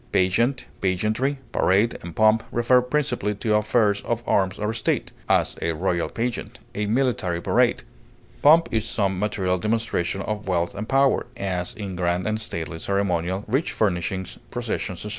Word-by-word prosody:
Pageant, 115 +8 +2 0.2
pageantry, 110 +9 0
parade, 100 +5 +2
and 85 -1 -8
pomp 110 +1 +4
refer 120 +2 +4
principally 125 -6 -1
to 110 +1 -1
affairs 105 -1 +2
of 120 0 -2
arms 95 -2 +1
or 105 +1 -1
state; 115 -1 -1 0.2
as, - - +2
a 85 - 0
royal 85 +1 -1
pageant; 120 +1 -3 0.2
a 105 0 -2
military 110 -7 0
parade. - - +2 0.6
Pomp 160 +3 +6
is 110 0 0
some 95 -3 0
material 95 -3 0
demonstration 105 -3 -1
of 105 -1 -4
wealth 85 -2 0
and 105 +2 -6
power, 135 0 +3
as 90 -2 -2
in 100 -4 -5
grand 90 0 0
and 110 0 -1
stately 85 -6 -4
ceremonial, 95 -1 -1
rich 135 +9 0
furnishings, 95 -2 -1
processions, 110 -6 -4
etc. - - -4
105 Hz, 155 wpm, -24 LUFS, 95-115 Hz, 0.6 s, Pomp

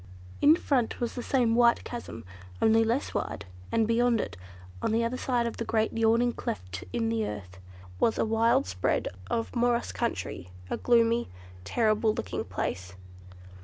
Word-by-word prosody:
In 300 +2 +7
front 265 -8 0
was 240 -1 -2
the 245 - -4
same 240 -3 +2
wide 235 0 +4
chasm, 235 - -7 0.3
only 225 0 +4
less 235 +5 -1
wide, 100 - -3 0.3
and 225 -1 +2
beyond 235 0 +3
it, - - -3 0.5
on - - 0
the 230 +1 +2
other 230 +2 -1
side 245 -2 0
of 235 - -4
the - - -2
great 220 -1 0
yawning 230 +2 +3
cleft 90 -2 -5
in 230 -2 0
the 225 -1 0
earth, 95 -3 -8 0.4
was 225 - +2
a - - +2
wild 225 - +3
spread 90 0 -1 0.2
of 230 +2 -2
morass 240 0 +1
country—a 90 - -4
gloomy, 235 0 +3 0.4
terrible 215 - +2
looking 90 - -3
place. 95 0 -4
230 Hz, 160 wpm, -28 LUFS, 215-240 Hz, 0.5 s, In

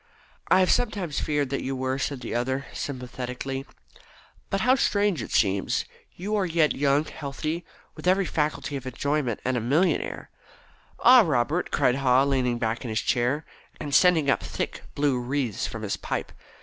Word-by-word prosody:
"I 185 - +5
have 185 - +3
sometimes 200 -10 0
feared 145 -3 -1
that 140 - -1
you 135 +1 -3
were," 130 +1 -2
said 135 -1 -2
the 120 - -5
other 130 +3 -1
sympathetically. 130 +1 -5 0.8
"But 195 - 0
how 250 +3 +5
strange 205 - +1
it - - -6
seems, 95 -2 +1 0.3
you 195 +4 -5
who 215 - +2
are 195 - +1
yet 165 -2 +2
young, 140 +2 +2
healthy, 155 +3 -4 0.3
with - - -6
every 190 +1 +4
faculty 150 -3 -1
for 130 0 -6
enjoyment, 140 -2 -1
and 130 0 +1
a - - -1
millionaire." 150 +11 0 0.7
"Ah, 250 0 +8
Robert," 155 - 0
cried 130 -3 +2
Haw, 130 -1 +4
leaning 130 -3 +1
back 115 0 -2
in 120 - -5
his 110 0 0
chair, 130 +5 0 0.3
and 145 -2 -5
sending 165 -2 +5
up 140 - +2
thick - - -4
blue 140 -3 +1
wreaths 125 -3 -2
from 115 -1 -7
his 100 - -2
pipe. - - -4
140 Hz, 175 wpm, -26 LUFS, 125-160 Hz, 0.8 s, Ah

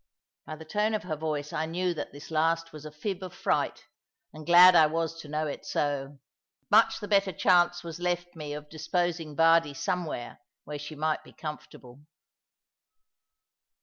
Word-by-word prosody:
By 155 - -5
the 160 +1 -11
tone 210 +6 0
of 215 - -3
her 160 -3 -3
voice 150 -1 -4
I 160 +1 -1
knew 180 +2 -1
that 160 - -6
this 145 +3 -12
last 165 +1 0
was 155 -1 -10
a - - -10
fib 185 +5 -4
of 180 -1 -8
fright, - - -1 0.5
and 155 -1 -11
glad 180 +1 +9
I 160 -3 +7
was 165 +1 -3
to 155 - -12
know 155 +1 -2
it 145 - -5
so. 140 -1 -2 0.5
Much 220 +2 +5
the 205 - -6
better 200 -2 +3
chance 175 0 +3
was 170 0 -7
left 175 0 -2
me 150 -2 -6
of 150 0 -7
disposing 165 0 -2
Bardie 165 -2 +4
somewhere, 160 -9 -3 0.2
where 150 -1 -6
she 150 +2 -8
might 155 +1 -1
be - - -16
comfortable. 140 -4 -9
160 Hz, 175 wpm, -28 LUFS, 150-175 Hz, 0.5 s, glad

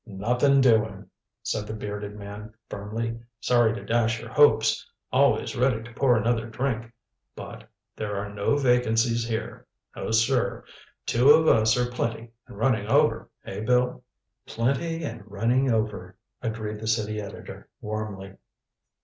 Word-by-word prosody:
"Nothing 125 +7 +2
doing," 110 -5 +2 0.4
said 105 - -2
the 110 - -5
bearded 105 -1 -6
man 105 +1 -9
firmly. 115 +3 -4 0.2
"Sorry 120 -2 +3
to - - -8
dash 115 -1 +1
your - - -9
hopes 145 -1 +4 0.3
always - - +2
ready 125 -3 +1
to 120 0 -12
pour 125 -1 +3
another 115 +1 0
drink. 115 0 -3 0.4
But - - -10 0.3
there 105 -1 -4
are 100 +1 -4
no 105 +8 +1
vacancies 120 -3 +2
here. 115 -1 -5 0.3
No, - - -5
sir. 110 0 +1 0.4
Two 125 +4 +3
of 160 +2 +7
us 110 +1 +4
are 125 - +2
plenty 115 -1 -3 0.2
and - - -12
running 110 -3 +1
over, - - +2 0.2
eh, - - -6
Bill?" 125 +3 +1 0.4
"Plenty 165 +8 -1
and 120 -6 -5
running 120 +6 +1
over," 105 -5 -2 0.2
agreed 110 -2 -4
the 110 - -6
city 110 -1 0
editor 100 - -10
warmly. 105 -3 -6
115 Hz, 140 wpm, -26 LUFS, 105-125 Hz, 0.4 s, of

